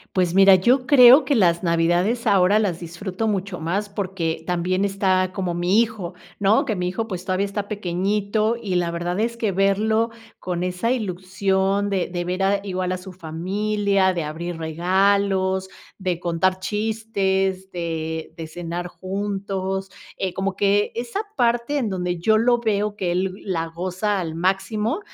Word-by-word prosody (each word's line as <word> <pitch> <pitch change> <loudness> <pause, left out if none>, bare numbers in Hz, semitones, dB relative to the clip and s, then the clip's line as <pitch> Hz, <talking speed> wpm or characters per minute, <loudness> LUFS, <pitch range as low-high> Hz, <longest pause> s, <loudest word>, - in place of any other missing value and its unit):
Pues 180 -2 +1
mira, 195 0 +8
yo 250 +7 +2
creo 255 +1 +8
que 285 - +1
las 175 -5 +3
navidades 175 +7 +1
ahora 200 0 +4
las 190 -6 -1
disfruto 185 +5 -4
mucho 195 -4 -2
más 195 +6 -2
porque 185 -5 -3
también 180 +2 0
está 190 -2 +1
como 185 -2 -2
mi 175 +5 +3
hijo, 215 -6 -2 0.3
¿no? 205 +6 +3
Que 220 -6 -1
mi 180 0 -1
hijo, 225 +5 -3
pues, 185 -2 -5
todavía 190 +1 0
está 200 0 -4
pequeñito 205 +3 0
y 190 -4 -2
la 175 -1 +1
verdad 175 +2 -3
es 235 +1 -1
que 220 -4 0
verlo 215 +4 +2 0.3
con 180 -1 -3
esa 180 +6 -1
ilusión 190 -1 0
de 195 -3 -1
de 175 -1 -3
ver 180 +2 -2
a 195 +1 +2
igual 185 -2 -2
a 185 - -2
su 185 0 -10
familia, 190 +3 0
de 170 -2 -2
abrir 165 +3 -5
regalos, 190 +3 +1 0.3
de 180 -3 -2
contar 180 +2 +1
chistes, 195 -3 -1
de 160 -2 -4
de 165 -1 -6
cenar 175 +1 -5
juntos, 195 0 -3 0.3
eh, 185 -2 -2
como 190 0 -2
que 205 +1 +2
esa 240 - -3 0.2
parte 240 +4 +1
en 245 -5 -1
donde 180 -2 -2
yo 215 +6 +3
lo 240 +2 +3
veo 210 -2 -1
que 180 -3 -1
él 185 +1 0
la 165 -3 -1
goza 185 +4 -2
al 160 -2 -4
máximo, 210 - 0
190 Hz, 165 wpm, -22 LUFS, 180-205 Hz, 0.3 s, mira